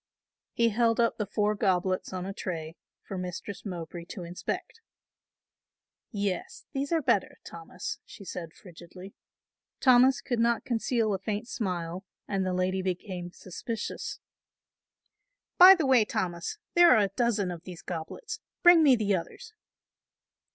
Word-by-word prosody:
He 235 Hz, 0 st, +3 dB
held 230 Hz, +1 st, +2 dB
up 230 Hz, 0 st, +2 dB
the 210 Hz, -, -1 dB
four 210 Hz, +1 st, +1 dB
goblets 185 Hz, -2 st, 0 dB
on 185 Hz, -1 st, -4 dB
a 195 Hz, -, -5 dB
tray 165 Hz, -4 st, -5 dB, 0.3 s
for 190 Hz, -, -6 dB
Mistress 180 Hz, +2 st, -6 dB
Mowbray 170 Hz, -3 st, -6 dB
to 180 Hz, +1 st, -8 dB
inspect. 175 Hz, -, -5 dB, 1.3 s
"Yes, 200 Hz, -5 st, -3 dB
those 275 Hz, +2 st, -2 dB
are 325 Hz, -2 st, +1 dB
better, 235 Hz, -7 st, +1 dB
Thomas," 170 Hz, +2 st, -7 dB
she 200 Hz, -, -13 dB
said 170 Hz, -3 st, -6 dB
frigidly. 180 Hz, +2 st, -12 dB, 0.7 s
Thomas 255 Hz, 0 st, +5 dB
could 245 Hz, -2 st, -2 dB
not 235 Hz, 0 st, +2 dB
conceal 230 Hz, -2 st, 0 dB
a 190 Hz, -, -2 dB
faint 210 Hz, +4 st, -3 dB
smile 180 Hz, -6 st, -3 dB, 0.2 s
and 195 Hz, -2 st, -1 dB
the 185 Hz, -, -1 dB
lady 185 Hz, +1 st, 0 dB
became 180 Hz, -1 st, -4 dB
suspicious. 210 Hz, +6 st, -6 dB, 1.4 s
"By 370 Hz, +2 st, +11 dB
the 325 Hz, -5 st, -1 dB
way, 260 Hz, -4 st, +5 dB
Thomas, 185 Hz, -, -3 dB, 0.2 s
there 345 Hz, 0 st, +7 dB
are 215 Hz, -, +4 dB
a 200 Hz, -, 0 dB
dozen 220 Hz, -6 st, +1 dB
of 170 Hz, -2 st, -7 dB
these 180 Hz, -1 st, -10 dB
goblets, 180 Hz, -, -6 dB, 0.2 s
bring 350 Hz, -2 st, +8 dB
me 280 Hz, -5 st, +6 dB
the 210 Hz, -3 st, 0 dB
others." 435 Hz, -, -7 dB
200 Hz, 145 wpm, -28 LUFS, 180-235 Hz, 1.4 s, By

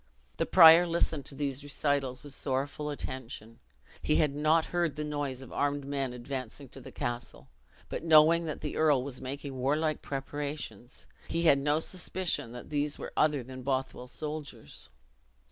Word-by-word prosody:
The -, -, 0 dB
prior 170 Hz, 0 st, +9 dB
listened 165 Hz, -4 st, 0 dB
to 140 Hz, -, -4 dB
these 140 Hz, -1 st, -3 dB
recitals 140 Hz, -2 st, -1 dB
with 145 Hz, -2 st, -7 dB
sorrowful 140 Hz, +2 st, -2 dB
attention. 120 Hz, -5 st, -6 dB, 0.4 s
He 150 Hz, -, +1 dB
had 150 Hz, -3 st, +3 dB
not 155 Hz, +2 st, +3 dB
heard 170 Hz, -4 st, +1 dB
the 150 Hz, -, -3 dB
noise 145 Hz, -3 st, -3 dB
of 130 Hz, -, -11 dB
armed 145 Hz, -1 st, 0 dB
men 135 Hz, -2 st, -2 dB
advancing 130 Hz, +1 st, -6 dB
to 135 Hz, +1 st, -8 dB
the -, -, -11 dB
castle; 120 Hz, -, -5 dB, 0.4 s
but -, -, -5 dB
knowing 165 Hz, +1 st, +6 dB
that 155 Hz, -, -5 dB
the -, -, -4 dB
earl 150 Hz, -5 st, +3 dB
was 135 Hz, -2 st, -5 dB
making 135 Hz, +1 st, -6 dB
warlike 150 Hz, +4 st, 0 dB
preparations, 140 Hz, -4 st, -6 dB, 0.2 s
he 165 Hz, 0 st, -1 dB
had 145 Hz, -4 st, +6 dB
no 145 Hz, +2 st, +2 dB
suspicion 180 Hz, -6 st, -1 dB
that 125 Hz, +4 st, -10 dB
these 145 Hz, 0 st, 0 dB
were -, -, -7 dB
other 150 Hz, -4 st, +2 dB
than 130 Hz, +1 st, -9 dB
the -, -, -9 dB
Bothwell 130 Hz, -1 st, -2 dB
soldiers. 150 Hz, -, -7 dB
145 Hz, 165 wpm, -30 LUFS, 130-155 Hz, 0.4 s, prior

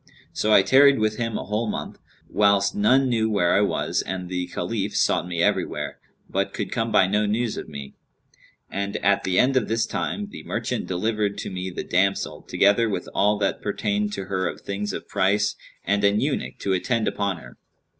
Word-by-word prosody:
So 110 Hz, -, 0 dB
I 100 Hz, -, +7 dB
tarried 135 Hz, +6 st, +6 dB
with 110 Hz, -1 st, 0 dB
him 115 Hz, -2 st, -2 dB
a -, -, -4 dB
whole 105 Hz, +2 st, -1 dB
month, -, -, -5 dB, 0.3 s
whilst 100 Hz, -1 st, +3 dB
none 130 Hz, +6 st, +3 dB
knew 110 Hz, -3 st, +1 dB
where 100 Hz, -5 st, +2 dB
I 100 Hz, -, +4 dB
was 100 Hz, -, 0 dB
and 90 Hz, -2 st, -5 dB
the 90 Hz, -1 st, -2 dB
Caliph -, -, -3 dB
sought -, -, +2 dB
me 85 Hz, -2 st, -1 dB
everywhere, -, -, -1 dB, 0.3 s
but -, -, -2 dB
could -, -, -3 dB
come 115 Hz, 0 st, -1 dB
by 100 Hz, -3 st, +5 dB
no 105 Hz, +2 st, +1 dB
news 110 Hz, +2 st, 0 dB
of -, -, -7 dB
me; 70 Hz, -2 st, -8 dB, 0.8 s
and 100 Hz, 0 st, -2 dB
at 100 Hz, 0 st, +3 dB
the 90 Hz, -1 st, 0 dB
end 130 Hz, +2 st, +4 dB
of 125 Hz, -4 st, +2 dB
this 115 Hz, 0 st, +1 dB
time, 205 Hz, -1 st, -3 dB
the -, -, -8 dB
merchant 110 Hz, +6 st, -3 dB
delivered 105 Hz, +2 st, -1 dB
to -, -, -5 dB
me 95 Hz, 0 st, -4 dB
the 90 Hz, -, -5 dB
damsel, 95 Hz, +2 st, 0 dB
together 105 Hz, +3 st, +3 dB
with 90 Hz, -3 st, -3 dB
all 105 Hz, +2 st, +3 dB
that 100 Hz, -1 st, -1 dB
pertained 105 Hz, 0 st, -1 dB
to 95 Hz, -, -4 dB
her 95 Hz, -1 st, -1 dB
of -, -, -6 dB
things 100 Hz, +1 st, -3 dB
of -, -, -6 dB
price 100 Hz, +1 st, +1 dB, 0.3 s
and 100 Hz, +1 st, +1 dB
an 100 Hz, +1 st, +4 dB
eunuch 140 Hz, 0 st, -2 dB
to 95 Hz, -, 0 dB
attend 115 Hz, +5 st, 0 dB
upon 100 Hz, -3 st, -1 dB
her. 60 Hz, -6 st, -13 dB
100 Hz, 200 wpm, -24 LUFS, 95-110 Hz, 0.8 s, I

